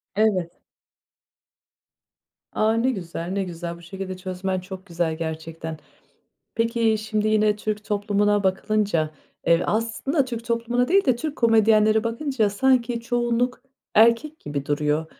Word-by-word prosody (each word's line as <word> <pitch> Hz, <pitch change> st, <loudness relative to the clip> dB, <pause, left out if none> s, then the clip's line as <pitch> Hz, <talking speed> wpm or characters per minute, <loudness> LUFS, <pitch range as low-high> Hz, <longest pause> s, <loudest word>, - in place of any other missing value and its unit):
Evet. 195 Hz, -5 st, +1 dB, 1.9 s
A, 220 Hz, +1 st, +2 dB
ne 235 Hz, +3 st, +2 dB
güzel, 175 Hz, -5 st, -5 dB
ne 195 Hz, 0 st, 0 dB
güzel. 170 Hz, -1 st, -6 dB
Bu -, -, -15 dB
şekilde 185 Hz, +2 st, -6 dB
çözmen 185 Hz, 0 st, -3 dB
çok 190 Hz, +1 st, -9 dB
güzel 170 Hz, -3 st, -2 dB
gerçekten. 160 Hz, 0 st, -5 dB, 0.8 s
Peki, 230 Hz, -1 st, +1 dB
şimdi, 215 Hz, 0 st, -1 dB
yine 215 Hz, -1 st, +3 dB
Türk 210 Hz, 0 st, -3 dB
toplumuna 205 Hz, -1 st, +1 dB
bakılınca, 190 Hz, -4 st, +1 dB, 0.4 s
eee, 170 Hz, +1 st, +4 dB
aslında 230 Hz, +6 st, 0 dB
Türk 235 Hz, -2 st, -6 dB
toplumuna 235 Hz, +1 st, 0 dB
değil 390 Hz, +2 st, +4 dB
de, 255 Hz, -4 st, +3 dB
Türk 295 Hz, +4 st, -4 dB
komedyenlere 220 Hz, -1 st, +4 dB
bakınca 230 Hz, -2 st, 0 dB
sanki 240 Hz, +2 st, +2 dB
çoğunluk 240 Hz, +1 st, 0 dB, 0.3 s
erkek 235 Hz, +8 st, +4 dB
gibi 145 Hz, -1 st, -4 dB
duruyor. 150 Hz, +2 st, 0 dB
215 Hz, 125 wpm, -24 LUFS, 180-230 Hz, 1.9 s, eee